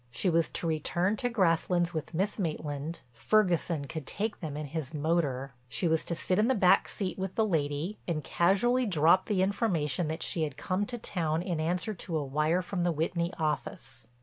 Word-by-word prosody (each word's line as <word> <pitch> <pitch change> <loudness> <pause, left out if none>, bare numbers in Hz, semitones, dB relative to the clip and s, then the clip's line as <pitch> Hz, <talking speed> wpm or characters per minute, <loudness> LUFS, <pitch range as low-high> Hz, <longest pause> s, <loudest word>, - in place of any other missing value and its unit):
She 120 +10 0
was 165 0 +2
to - - -4
return 175 +5 +1
to 245 - 0
Grasslands 175 -4 +2
with 160 0 -4
Miss 200 +5 -1
Maitland, 155 -2 -3
Ferguson 170 - +1
could 155 -1 -6
take 215 +2 -2
them 150 -5 -5
in 150 - -4
his 155 0 -5
motor. 145 -4 0 0.2
She 115 +9 0
was 160 -1 +2
to 170 - -2
sit 185 +3 +1
in 215 - +4
the 265 - +3
back 185 -4 +5
seat 190 -2 -4
with 190 -1 -3
the 220 - +3
lady 155 +1 -1
and 155 -4 -1
casually 230 - +2
drop 170 +1 +4
the 195 -4 +2
information 180 - 0
that 160 +1 -3
she 165 - -2
had 145 -3 -2
come 190 +6 -1
to 245 - -4
town 165 -7 -1
in 175 -3 -2
answer 175 +7 -1
to 170 -3 -4
a 145 - -2
wire 155 +6 +1
from 185 0 -3
the 175 0 +2
Whitney 170 +2 -1
office. 150 -6 -3
170 Hz, 200 wpm, -30 LUFS, 155-190 Hz, 0.2 s, back